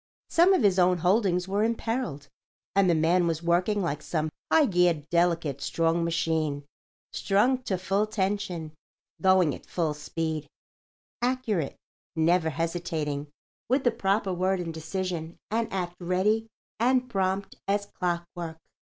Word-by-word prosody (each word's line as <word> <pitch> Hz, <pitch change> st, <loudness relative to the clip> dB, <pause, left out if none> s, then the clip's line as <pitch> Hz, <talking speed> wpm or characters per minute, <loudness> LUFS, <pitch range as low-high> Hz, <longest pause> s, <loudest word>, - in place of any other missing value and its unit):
Some 360 Hz, +3 st, +6 dB
of 295 Hz, -, +1 dB
his 195 Hz, -2 st, +4 dB
own 180 Hz, 0 st, +4 dB
holdings 180 Hz, 0 st, +2 dB
were 200 Hz, +2 st, +1 dB
imperilled, 225 Hz, -, -2 dB, 0.5 s
and 195 Hz, -2 st, +4 dB
the 170 Hz, -, +4 dB
man 170 Hz, +3 st, +3 dB
was 165 Hz, 0 st, -1 dB
working 180 Hz, +4 st, +2 dB
like 150 Hz, -4 st, -2 dB
some 155 Hz, -2 st, -2 dB, 0.2 s
high 315 Hz, -2 st, +6 dB
geared, 175 Hz, -, +2 dB
delicate, 170 Hz, -5 st, +1 dB
strong 165 Hz, +2 st, +1 dB
machine—strung 165 Hz, -, -1 dB
to 200 Hz, -7 st, -2 dB
full 195 Hz, +4 st, 0 dB
tension, 190 Hz, -6 st, -2 dB, 0.5 s
going 185 Hz, -5 st, +4 dB
at -, -, -10 dB
full 165 Hz, -4 st, -1 dB
speed, 155 Hz, 0 st, -3 dB, 0.7 s
accurate, 240 Hz, -, 0 dB, 0.4 s
never 165 Hz, +1 st, +3 dB
hesitating, 160 Hz, -2 st, -2 dB, 0.4 s
with 260 Hz, +2 st, +2 dB
the 245 Hz, -, +4 dB
proper 195 Hz, 0 st, 0 dB
word 185 Hz, +1 st, +1 dB
and 165 Hz, -2 st, -4 dB
decision 165 Hz, 0 st, -4 dB
and 225 Hz, +1 st, 0 dB
act 175 Hz, -2 st, -3 dB
ready 190 Hz, +5 st, +1 dB, 0.3 s
and 250 Hz, +2 st, +3 dB
prompt 195 Hz, -2 st, -1 dB
as 200 Hz, +1 st, +1 dB
clockwork. 175 Hz, -3 st, -4 dB
180 Hz, 135 wpm, -27 LUFS, 165-200 Hz, 0.7 s, Some